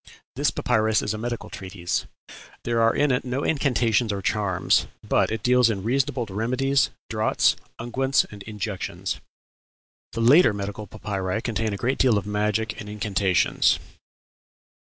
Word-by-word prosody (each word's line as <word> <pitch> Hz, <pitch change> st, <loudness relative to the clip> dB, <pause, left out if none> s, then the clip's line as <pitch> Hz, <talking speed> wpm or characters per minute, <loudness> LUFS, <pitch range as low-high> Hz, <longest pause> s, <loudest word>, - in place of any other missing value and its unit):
This -, -, +2 dB
papyrus 110 Hz, 0 st, +1 dB
is 105 Hz, -, -1 dB
a 110 Hz, -, -5 dB
medical 120 Hz, +1 st, -4 dB
treatise; 95 Hz, -2 st, -3 dB, 0.6 s
there 115 Hz, -1 st, 0 dB
are 115 Hz, 0 st, +3 dB
in 145 Hz, -1 st, +2 dB
it 125 Hz, -, +1 dB
no 130 Hz, +3 st, -2 dB
incantations 120 Hz, -6 st, +1 dB
or 100 Hz, -, -2 dB
charms; 100 Hz, -1 st, +1 dB, 0.2 s
but -, -, +2 dB
it 110 Hz, -2 st, -4 dB
deals 125 Hz, 0 st, +4 dB
in 100 Hz, -4 st, -2 dB
reasonable 130 Hz, +2 st, 0 dB
remedies, 130 Hz, +6 st, +1 dB, 0.2 s
draughts, 110 Hz, 0 st, +2 dB, 0.2 s
unguents 130 Hz, +3 st, +1 dB
and 105 Hz, -1 st, -10 dB
injections. 105 Hz, -1 st, -4 dB, 0.9 s
The 115 Hz, -, -2 dB
later 125 Hz, +1 st, +6 dB
medical 100 Hz, +1 st, -5 dB
papyri 100 Hz, -1 st, -3 dB
contain 110 Hz, -1 st, -1 dB
a 100 Hz, -, -3 dB
great 130 Hz, +7 st, -1 dB
deal 125 Hz, -5 st, +4 dB
of 100 Hz, -, -2 dB
magic 105 Hz, +1 st, -1 dB
and 105 Hz, -, -8 dB
incantations. 100 Hz, -3 st, +2 dB
110 Hz, 145 wpm, -24 LUFS, 105-125 Hz, 0.9 s, later